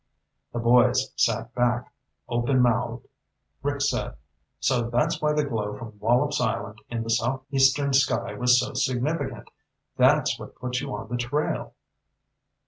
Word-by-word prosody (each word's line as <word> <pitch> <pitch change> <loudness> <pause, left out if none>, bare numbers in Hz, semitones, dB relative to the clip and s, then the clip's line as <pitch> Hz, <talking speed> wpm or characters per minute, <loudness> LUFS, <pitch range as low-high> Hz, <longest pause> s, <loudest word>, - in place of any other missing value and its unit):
The - - -5
boys 125 +2 +3
sat 115 +1 0
back, 120 0 0 0.3
openmouthed. 120 -1 +1 0.6
Rick - - -2
said, - - -1 0.4
"So 120 -3 +1
that's 120 +1 0
why 150 0 +2
the 150 0 +1
glow 105 -6 -3
from 110 -2 -10
Wallops 120 +4 +2
Island 110 -3 -2
in 115 -1 -3
the 115 - -3
south 130 +3 0
eastern 135 +1 +3
sky 135 +1 +2
was 125 0 +4
so 125 - -3
significant. 130 -1 -2 0.5
That's 135 +3 +3
what - - -10
put 125 0 -3
you 140 -1 -5
on - - -7
the 120 +2 -3
trail!" 125 +5 -2
125 Hz, 140 wpm, -25 LUFS, 120-130 Hz, 0.6 s, was